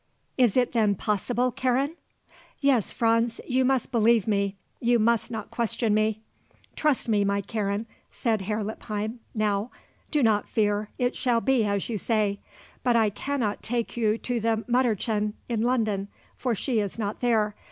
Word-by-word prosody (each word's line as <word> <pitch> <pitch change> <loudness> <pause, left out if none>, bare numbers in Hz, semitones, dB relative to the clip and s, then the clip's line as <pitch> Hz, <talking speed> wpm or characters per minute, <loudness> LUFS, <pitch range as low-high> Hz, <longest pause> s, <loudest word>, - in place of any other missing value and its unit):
Is 250 -3 +3
it 250 -1 +3
then 215 -4 +2
possible, 240 +6 0
Karen?" 260 +5 0 0.6
"Yes, 270 -7 +2
Franz; 230 0 +1
you 260 0 +2
must 260 -1 +1
believe 230 -3 +4
me. 200 -2 0 0.2
You 240 0 +3
must 230 0 +2
not 220 -3 -6
question 230 -1 0
me." 215 0 +1 0.5
"Trust 300 -6 +1
me, 210 -3 +3
my 200 0 +1
Karen," 205 +1 -2 0.2
said 225 -4 -1
Herr 210 +2 -2
Lippheim 215 +2 -4 0.2
now; 210 +1 0 0.4
"do 295 -3 +1
not 215 -3 +2
fear. 210 -1 0
It 245 0 0
shall 240 -2 +2
be 255 -2 +2
as 200 -1 -1
you 220 -3 -2
say. 210 -1 0 0.4
But 245 -1 +2
I 220 -2 +3
cannot 240 -2 -2
take 235 0 -2
you 220 -2 +1
to 245 0 -2
the 225 0 0
Mütterchen 220 -4 +1
in 230 -3 -1
London, 220 -5 +1 0.3
for 245 -3 -1
she 235 +2 0
is 205 0 -3
not 210 -2 -3
there. 220 -4 +2
225 Hz, 165 wpm, -26 LUFS, 210-245 Hz, 0.6 s, believe